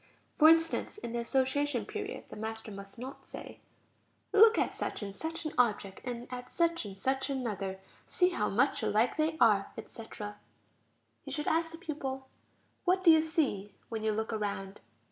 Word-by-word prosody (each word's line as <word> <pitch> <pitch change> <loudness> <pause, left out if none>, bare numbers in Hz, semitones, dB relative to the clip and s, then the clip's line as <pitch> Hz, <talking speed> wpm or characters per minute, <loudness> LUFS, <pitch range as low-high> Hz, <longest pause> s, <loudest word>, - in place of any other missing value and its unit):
For 310 0 +9
instance, 330 +4 +3
in 310 - -6
the 240 - -1
association 265 0 +1
period, 420 - -6
the - - -8
master 220 0 -5
must 195 +1 -9
not 260 +3 -8
say: - - -9 0.7
"Look 440 +2 +8
at - - +1
such - - -3
and 200 -1 -6
such 325 +6 -4
an 310 - -3
object, 205 -5 +1
and 245 -1 -5
at 250 0 -7
such 335 -5 +1
and 195 -1 -8
such 265 +6 0
another; 205 -8 -3 0.3
see 360 -1 +3
how 210 -12 0
much 250 +8 +2
alike 220 +4 +2
they 315 +1 +1
are, 210 -4 +4
etc...." 215 -2 -8 0.8
He - - -10
should 300 -1 -2
ask 325 0 +2
the 330 - -8
pupil: 270 -6 -5 0.6
"What 370 +1 +2
do 340 - +9
you 320 -1 +7
see 285 - -1
when 225 -2 -3
you 220 0 +1
look 220 +2 -2
around? 200 -2 -3
250 Hz, 175 wpm, -31 LUFS, 215-320 Hz, 0.8 s, For